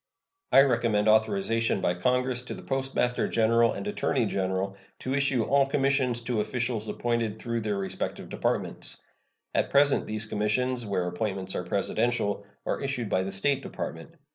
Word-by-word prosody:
I 135 Hz, -, +8 dB
recommend 115 Hz, -5 st, +2 dB
authorization 115 Hz, -, +2 dB
by 90 Hz, -2 st, +1 dB
Congress 125 Hz, +6 st, 0 dB
to 125 Hz, -, -7 dB
the -, -, -10 dB
Postmaster 135 Hz, -2 st, 0 dB
General 115 Hz, +1 st, +3 dB
and 100 Hz, -, -5 dB
Attorney -, -, 0 dB
General 95 Hz, +1 st, -1 dB, 0.2 s
to 130 Hz, -, -3 dB
issue 135 Hz, -4 st, +2 dB
all 140 Hz, +2 st, +3 dB
commissions 135 Hz, -3 st, +1 dB
to 115 Hz, -2 st, -1 dB
officials 115 Hz, -1 st, -2 dB
appointed 115 Hz, -3 st, -1 dB
through 115 Hz, 0 st, -3 dB
their 105 Hz, -2 st, -1 dB
respective 95 Hz, -1 st, -4 dB
Departments. -, -, -2 dB, 0.5 s
At -, -, +1 dB
present 140 Hz, 0 st, +4 dB
these 110 Hz, 0 st, -3 dB
commissions, 110 Hz, +3 st, 0 dB
where 90 Hz, -3 st, 0 dB
appointments 95 Hz, +1 st, -2 dB
are -, -, -1 dB
Presidential, 100 Hz, +2 st, 0 dB, 0.2 s
are -, -, -1 dB
issued 135 Hz, -5 st, -2 dB
by 95 Hz, -, +2 dB
the 95 Hz, +1 st, -3 dB
State 135 Hz, +8 st, +1 dB
Department. 165 Hz, +3 st, -6 dB
115 Hz, 155 wpm, -28 LUFS, 100-130 Hz, 0.5 s, I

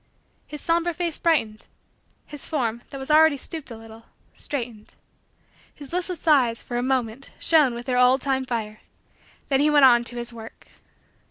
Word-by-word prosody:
His 300 Hz, -1 st, -7 dB
somber 340 Hz, +1 st, 0 dB
face 340 Hz, -1 st, -3 dB
brightened. 225 Hz, -11 st, 0 dB, 0.6 s
His 295 Hz, -1 st, -9 dB
form, 235 Hz, -7 st, -2 dB
that 275 Hz, -, -8 dB
was 265 Hz, +2 st, -4 dB
already 310 Hz, -1 st, +5 dB
stooped 315 Hz, +1 st, -8 dB
a 230 Hz, -, -8 dB
little, 225 Hz, 0 st, -14 dB, 0.3 s
straightened. 235 Hz, -6 st, -6 dB, 0.8 s
His 285 Hz, +1 st, -11 dB
listless 355 Hz, -2 st, -4 dB
eyes, 250 Hz, -7 st, +3 dB
for 240 Hz, -, -6 dB
a -, -, 0 dB
moment, 255 Hz, 0 st, -2 dB
shone 300 Hz, -7 st, +3 dB
with 240 Hz, +1 st, -7 dB
their 250 Hz, -1 st, 0 dB
old 250 Hz, +1 st, +5 dB
time 265 Hz, -2 st, -1 dB
fire. 215 Hz, -3 st, -4 dB, 0.7 s
Then 270 Hz, -1 st, +2 dB
he 295 Hz, +2 st, +3 dB
went 290 Hz, -2 st, +6 dB
on 240 Hz, -2 st, +5 dB
to 245 Hz, -, -6 dB
his 240 Hz, 0 st, -5 dB
work. 225 Hz, -1 st, -12 dB
265 Hz, 170 wpm, -24 LUFS, 235-300 Hz, 0.8 s, went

